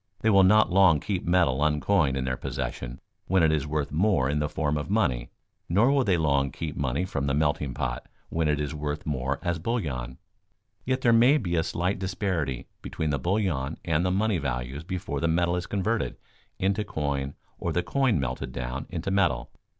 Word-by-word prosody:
They 110 Hz, -, +3 dB
will 100 Hz, -1 st, +6 dB
not 105 Hz, +2 st, +5 dB
long 90 Hz, -5 st, +5 dB
keep 95 Hz, +2 st, -3 dB
metal 85 Hz, -7 st, +3 dB
uncoined 75 Hz, -1 st, +2 dB
in 65 Hz, -, -1 dB
their 65 Hz, 0 st, -1 dB
possession 65 Hz, -2 st, -5 dB, 0.3 s
when 95 Hz, -2 st, +3 dB
it 80 Hz, -, +4 dB
is 75 Hz, -2 st, 0 dB
worth 75 Hz, -2 st, -2 dB
more 80 Hz, -4 st, +2 dB
in 75 Hz, -, 0 dB
the 75 Hz, 0 st, -1 dB
form 75 Hz, -1 st, -1 dB
of 75 Hz, +3 st, -3 dB
money, 65 Hz, -, +1 dB, 0.4 s
nor 105 Hz, +10 st, +4 dB
will 140 Hz, -2 st, +3 dB
they 95 Hz, -6 st, +2 dB
long 70 Hz, -3 st, +2 dB
keep 75 Hz, +2 st, -5 dB
money 70 Hz, +5 st, -1 dB
from 70 Hz, -6 st, -2 dB
the 70 Hz, -, +1 dB
melting 75 Hz, -3 st, 0 dB
pot -, -, -3 dB, 0.2 s
when 80 Hz, -1 st, 0 dB
it 75 Hz, -1 st, +1 dB
is 75 Hz, +1 st, -2 dB
worth 75 Hz, 0 st, -4 dB
more 70 Hz, -2 st, -1 dB
as 85 Hz, -2 st, -1 dB
bullion. 70 Hz, -, -3 dB, 0.7 s
Yet 130 Hz, 0 st, 0 dB
there 120 Hz, -3 st, +4 dB
may 125 Hz, +6 st, +6 dB
be 90 Hz, -, -2 dB
a 80 Hz, -, +3 dB
slight 90 Hz, +4 st, -1 dB
disparity 90 Hz, -, -2 dB, 0.2 s
between 80 Hz, -2 st, -3 dB
the 70 Hz, -, 0 dB
bullion 85 Hz, -4 st, -1 dB
and 80 Hz, 0 st, +1 dB
the 90 Hz, -, +1 dB
money 100 Hz, 0 st, +1 dB
values 65 Hz, +1 st, -3 dB
before 90 Hz, -5 st, -4 dB
the 85 Hz, -, +1 dB
metal 85 Hz, +2 st, +2 dB
is 90 Hz, 0 st, -3 dB
converted 105 Hz, +3 st, -1 dB, 0.4 s
into 100 Hz, +3 st, 0 dB
coin 70 Hz, -7 st, -3 dB, 0.2 s
or -, -, -2 dB
the 90 Hz, -, 0 dB
coin 130 Hz, -, +1 dB
melted 65 Hz, -2 st, -3 dB
down 60 Hz, +3 st, -4 dB
into 90 Hz, +2 st, -3 dB
metal. 95 Hz, -11 st, +1 dB
80 Hz, 195 wpm, -27 LUFS, 70-95 Hz, 0.7 s, will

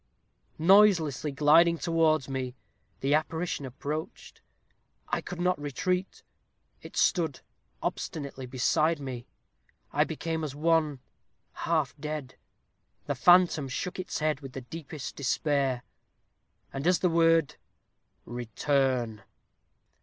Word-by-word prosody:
Noiselessly 170 Hz, -5 st, +4 dB
gliding 160 Hz, +4 st, +5 dB
towards 160 Hz, -4 st, +2 dB
me, 130 Hz, -2 st, -4 dB, 0.5 s
the 140 Hz, +2 st, +1 dB
apparition 160 Hz, -1 st, -1 dB
approached. 150 Hz, +5 st, -6 dB, 0.7 s
I -, -, 0 dB
could 180 Hz, -, -7 dB
not 180 Hz, -3 st, +1 dB
retreat. 180 Hz, +7 st, -2 dB, 0.6 s
It -, -, -11 dB
stood 160 Hz, -7 st, +1 dB, 0.4 s
obstinately 140 Hz, -4 st, -4 dB
beside 155 Hz, +6 st, +1 dB
me. 130 Hz, -4 st, -6 dB, 0.7 s
I -, -, +4 dB
became 160 Hz, -1 st, -3 dB
as 145 Hz, -3 st, -4 dB
one 155 Hz, -3 st, +1 dB, 0.5 s
half 155 Hz, -6 st, -1 dB
dead. 150 Hz, -3 st, -5 dB, 0.7 s
The -, -, -1 dB
phantom 175 Hz, -5 st, +5 dB
shook 180 Hz, +8 st, -4 dB
its 180 Hz, -, -3 dB
head 155 Hz, -2 st, 0 dB
with 135 Hz, -2 st, -9 dB
the 135 Hz, -, -6 dB
deepest 150 Hz, +2 st, -8 dB
despair; 140 Hz, -2 st, 0 dB, 0.9 s
and 135 Hz, +4 st, -2 dB
as 180 Hz, -1 st, +5 dB
the 180 Hz, -, +1 dB
word 165 Hz, -2 st, +3 dB, 0.7 s
'Return!' 120 Hz, -1 st, -1 dB
150 Hz, 110 wpm, -28 LUFS, 135-165 Hz, 0.9 s, gliding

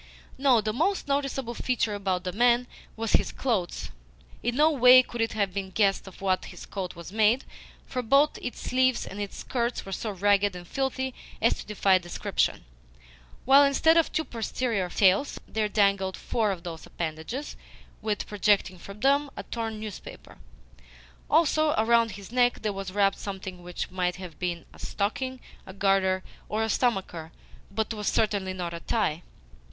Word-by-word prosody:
No, 260 Hz, -4 st, +4 dB
the 215 Hz, 0 st, -2 dB
most 385 Hz, -, 0 dB
noticeable 275 Hz, -3 st, -1 dB
feature 240 Hz, -3 st, -1 dB
about 190 Hz, -3 st, -1 dB
the 180 Hz, -, -3 dB
man 240 Hz, +4 st, +3 dB, 0.3 s
was 225 Hz, -1 st, -3 dB
his -, -, +3 dB
clothes. 210 Hz, -10 st, -2 dB, 0.5 s
In 240 Hz, 0 st, -1 dB
no 305 Hz, +3 st, +5 dB
way 255 Hz, -2 st, +8 dB
could 240 Hz, -2 st, -5 dB
it 225 Hz, -, 0 dB
have 200 Hz, -4 st, 0 dB
been 195 Hz, -1 st, -3 dB
guessed 195 Hz, 0 st, +1 dB
of 190 Hz, -, -12 dB
what 190 Hz, -1 st, 0 dB
his -, -, -10 dB
coat 185 Hz, -3 st, -5 dB
was 170 Hz, +1 st, -9 dB
made, 220 Hz, +4 st, +3 dB, 0.4 s
for 255 Hz, -, -3 dB
both 275 Hz, +5 st, +3 dB
its 245 Hz, -, -6 dB
sleeves 255 Hz, 0 st, +1 dB
and 200 Hz, +2 st, -7 dB
its 200 Hz, -, -5 dB
skirts 240 Hz, -1 st, -2 dB
were 195 Hz, -, -8 dB
so 215 Hz, +3 st, -3 dB
ragged 200 Hz, 0 st, +2 dB
and 175 Hz, -1 st, -9 dB
filthy 265 Hz, +1 st, -2 dB, 0.3 s
as -, -, +2 dB
to -, -, -9 dB
defy 195 Hz, -2 st, +3 dB
description, 175 Hz, -1 st, -1 dB, 0.8 s
while 275 Hz, +2 st, +7 dB
instead 285 Hz, +4 st, +4 dB
of 330 Hz, -1 st, +3 dB
two 315 Hz, -, 0 dB
posterior 225 Hz, -4 st, -2 dB
tails, 195 Hz, +8 st, +3 dB
there 215 Hz, -1 st, -1 dB
dangled 200 Hz, -2 st, +2 dB
four 220 Hz, -3 st, 0 dB
of 185 Hz, -4 st, -3 dB
those 165 Hz, -3 st, -7 dB
appendages, 165 Hz, -, -5 dB, 0.5 s
with, 215 Hz, -1 st, -2 dB
projecting 200 Hz, -3 st, +1 dB
from 200 Hz, +3 st, -11 dB
them, 280 Hz, +2 st, +3 dB
a -, -, -4 dB
torn 225 Hz, -2 st, -4 dB
newspaper. 215 Hz, -3 st, -9 dB, 0.9 s
Also, 310 Hz, -1 st, +3 dB
around 230 Hz, 0 st, +3 dB
his 200 Hz, +1 st, -10 dB
neck 245 Hz, -1 st, +2 dB
there 210 Hz, -2 st, 0 dB
was 195 Hz, -1 st, -5 dB
wrapped 195 Hz, 0 st, +2 dB
something 190 Hz, -2 st, -6 dB
which 175 Hz, +1 st, -5 dB
might 180 Hz, -1 st, -1 dB
have 180 Hz, -4 st, -10 dB
been 175 Hz, -2 st, -3 dB
a -, -, -16 dB
stocking, 255 Hz, +6 st, -2 dB, 0.3 s
a 190 Hz, -, -8 dB
garter, 195 Hz, -1 st, +2 dB, 0.3 s
or 215 Hz, +1 st, 0 dB
a 220 Hz, -, -1 dB
stomacher, 190 Hz, -9 st, -1 dB, 0.4 s
but 220 Hz, +2 st, -2 dB
was 210 Hz, -2 st, -5 dB
certainly 205 Hz, -4 st, +1 dB
not 175 Hz, -2 st, -4 dB
a 170 Hz, -, -5 dB
tie. 175 Hz, -6 st, -1 dB
210 Hz, 170 wpm, -27 LUFS, 190-245 Hz, 0.9 s, way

